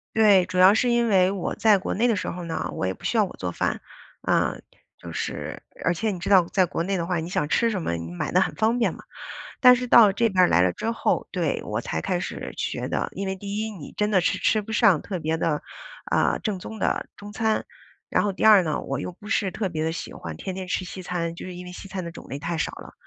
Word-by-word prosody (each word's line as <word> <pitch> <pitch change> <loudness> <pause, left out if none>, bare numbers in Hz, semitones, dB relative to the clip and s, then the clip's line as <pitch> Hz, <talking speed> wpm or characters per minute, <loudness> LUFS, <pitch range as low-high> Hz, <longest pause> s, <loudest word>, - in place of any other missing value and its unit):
对。 205 -4 +6
主 180 - -5
要 185 +2 +8
是 245 +3 +2
因 235 0 +2
为 185 -2 +4
我 195 -2 -3
在 215 -2 +5
国 190 - -3
内 235 +4 +2
的 230 - +2
时 185 - -3
候 180 0 -6
呢， 165 -1 -3
我 - - -2
也 95 - -1
不 - - -19
需 235 - 0
要 215 - +5
我 - - -10
做 90 -1 -3
饭， - - -2 0.4
啊， - - +1 0.4
就 85 - -9
是 - - -4 0.2
而 175 - +2
且 215 +5 -1
你 185 - -5
知 175 - -4
道 190 -3 +7
在 190 -2 +3
国 165 - -3
内 195 +2 -1
的 170 - -2
话， 175 -1 -1
你 160 +2 -5
想 150 -5 -1
吃 230 +9 +2
什 200 -5 -2
么 125 - -2
你 85 0 -6
买 90 - -3
得 180 - +4
很 - - 0
方 225 +2 +1
便 235 - +1
嘛。 - - -12 0.6
但 250 -1 +8
是 250 0 -3
到 230 -4 +7
这 230 +4 +1
边 185 -2 +4
儿 - - +6
来 90 - +4
了 90 0 +3
之 225 - -2
后， 230 - 0
对， - - -1
我 - - -2
才 - - -3
开 185 -2 -1
始 - - -6
学 - - -3
的， - - -2
因 195 - -4
为 190 - -2
第 200 +1 -5
一， 220 0 -2
你 175 -9 -10
真 210 0 +1
的 190 -3 +4
是 - - +1
吃 215 - +2
不 210 - -9
上 210 -8 +4
特 190 -3 -5
别 160 0 -1
地， 155 -2 0 0.5
呃， - - +2
正 205 -4 -3
宗 220 +4 -8
的 - - 0
中 205 0 -10
餐。 220 +1 0 0.4
然 - - +2
后 200 - 0
第 - - -4
二 215 -3 +8
呢， 155 -3 -2
我 135 - -3
又 180 - -5
不 210 +4 -12
是 200 -4 +1
特 195 +1 -2
别 155 -2 -3
地 160 - 0
喜 - - -6
欢 80 -2 -7
天 190 - -5
天 185 0 -6
吃 185 - -1
西 185 +1 -7
餐， 175 -2 -3
就 170 - -9
是 185 -1 -7
因 180 0 -8
为 180 - -8
西 180 - -9
餐 190 -1 -5
的 170 - -6
种 165 - -12
类 140 - -5
太 170 +2 -3
少 155 - -1
了， - - -11
185 Hz, 300 characters per minute, -24 LUFS, 170-215 Hz, 0.6 s, 要